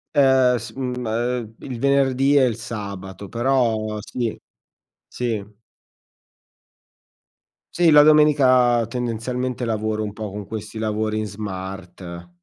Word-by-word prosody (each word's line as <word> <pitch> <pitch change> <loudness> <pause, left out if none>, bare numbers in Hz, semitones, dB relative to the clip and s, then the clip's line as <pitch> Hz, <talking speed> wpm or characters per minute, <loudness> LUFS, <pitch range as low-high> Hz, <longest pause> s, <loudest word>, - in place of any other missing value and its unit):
Ehm, 130 -3 +5
s 115 - -8
mhmm, 125 -2 -3
ehm, 115 0 -2
il 125 -3 -7
venerdì 140 0 +3
e 135 - +6
il 120 -4 +1
sabato, 100 -4 -7
però 115 -3 0
sì, 115 0 -3 0.7
sì. 115 -5 -3 2.3
Sì, 175 -1 +4
la 150 -1 +8
domenica, 130 -6 +5
tendenzialmente, 125 +1 -3
lavoro 110 -1 -1
un 105 - -4
po' 105 0 -6
con 100 0 -7
questi 110 +1 -7
lavori 110 0 -1
in 110 - -2
smart. 95 -4 -7
115 Hz, 115 wpm, -22 LUFS, 105-130 Hz, 2.3 s, la